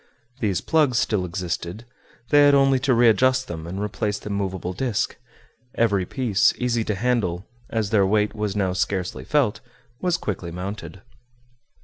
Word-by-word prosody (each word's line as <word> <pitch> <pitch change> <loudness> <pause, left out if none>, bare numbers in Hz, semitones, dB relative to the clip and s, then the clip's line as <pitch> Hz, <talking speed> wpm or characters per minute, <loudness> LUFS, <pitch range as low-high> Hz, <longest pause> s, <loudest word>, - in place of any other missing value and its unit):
These 100 -7 0
plugs 150 -7 +2
still 105 -4 +1
existed; 90 +3 -4 0.4
they 145 0 +6
had 145 0 +6
only 135 -1 +4
to 135 0 +2
readjust 125 +3 +4
them 80 -1 -6
and 95 +3 -5
replace 105 0 -2
the 105 - -7
movable 95 -2 -3
disc; 115 +1 -1 0.6
every 100 -5 +1
piece, 120 -8 +2
easy 120 -2 0
to 105 - -1
handle, 100 -5 0 0.2
as 110 -3 -1
their 100 -3 +4
weight 105 +1 +1
was 105 -2 -3
now 95 -3 0
scarcely 95 0 -2
felt, 140 -8 +1 0.4
was 180 -1 +1
quickly 90 -4 -4
mounted. 95 +3 -7
105 Hz, 150 wpm, -23 LUFS, 95-125 Hz, 0.6 s, they